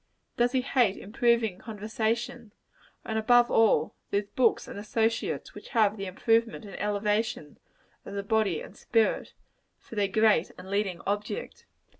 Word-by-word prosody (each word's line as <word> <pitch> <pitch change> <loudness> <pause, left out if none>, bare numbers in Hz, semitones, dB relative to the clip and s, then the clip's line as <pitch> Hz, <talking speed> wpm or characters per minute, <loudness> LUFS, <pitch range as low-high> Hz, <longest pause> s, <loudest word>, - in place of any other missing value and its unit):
Does 240 +1 +2
he 260 - +2
hate 245 -6 +2
improving 230 -2 +1
conversation 225 +1 -3 0.5
and 220 0 -1
above 240 +2 +4
all, 225 -2 +3 0.2
those 200 0 0
books 245 -3 +2
and - - -7
associates 225 +2 -1
which - - -11
have 215 -2 +4
the 195 -2 -5
improvement 225 +4 +1
and 200 - -10
elevation 210 -5 -1 0.4
of - - -8
the 200 - -2
body 205 -4 +1
and - - -11
spirit, 225 -2 0 0.4
for - - -16
their 205 -2 +1
great 210 -3 +3
and 185 +1 -10
leading 200 -4 -1
object? 210 - -4
220 Hz, 145 wpm, -28 LUFS, 200-230 Hz, 0.5 s, above